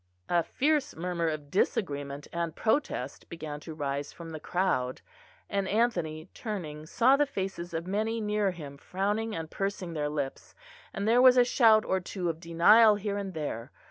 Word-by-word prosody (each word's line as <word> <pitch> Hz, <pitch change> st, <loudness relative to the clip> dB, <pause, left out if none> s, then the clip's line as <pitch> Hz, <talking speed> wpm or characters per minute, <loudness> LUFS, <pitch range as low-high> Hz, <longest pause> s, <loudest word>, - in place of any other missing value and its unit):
A 175 Hz, -1 st, +3 dB
fierce 290 Hz, -, 0 dB
murmur 170 Hz, 0 st, -1 dB
of 150 Hz, -2 st, -5 dB
disagreement 145 Hz, -7 st, -1 dB
and 170 Hz, -1 st, -2 dB
protest 220 Hz, -, -1 dB
began 155 Hz, -3 st, -6 dB
to 155 Hz, +1 st, -9 dB
rise 140 Hz, -1 st, -3 dB
from 165 Hz, -1 st, -9 dB
the 155 Hz, -, -6 dB
crowd; 150 Hz, -9 st, 0 dB, 0.5 s
and 200 Hz, -1 st, -1 dB
Anthony 175 Hz, -8 st, 0 dB
turning 155 Hz, -9 st, -5 dB
saw 255 Hz, +10 st, +4 dB
the 290 Hz, +1 st, +2 dB
faces 190 Hz, -7 st, -4 dB
of 165 Hz, 0 st, -3 dB
many 215 Hz, +4 st, -1 dB
near 210 Hz, -2 st, +1 dB
him 150 Hz, -6 st, -8 dB
frowning 205 Hz, +7 st, -2 dB
and 160 Hz, -1 st, -5 dB
pursing 195 Hz, -3 st, -3 dB
their 150 Hz, -2 st, -1 dB
lips, 145 Hz, -3 st, -4 dB, 0.4 s
and 200 Hz, +2 st, -3 dB
there 240 Hz, +2 st, +5 dB
was 255 Hz, 0 st, +7 dB
a 245 Hz, -, +7 dB
shout 225 Hz, -3 st, +5 dB
or 190 Hz, -, +1 dB
two 180 Hz, 0 st, -3 dB
of 165 Hz, -1 st, -3 dB
denial 205 Hz, +7 st, +6 dB
here 205 Hz, 0 st, -3 dB
and 195 Hz, -3 st, -5 dB
there. 145 Hz, -5 st, -4 dB
180 Hz, 175 wpm, -29 LUFS, 155-210 Hz, 0.5 s, was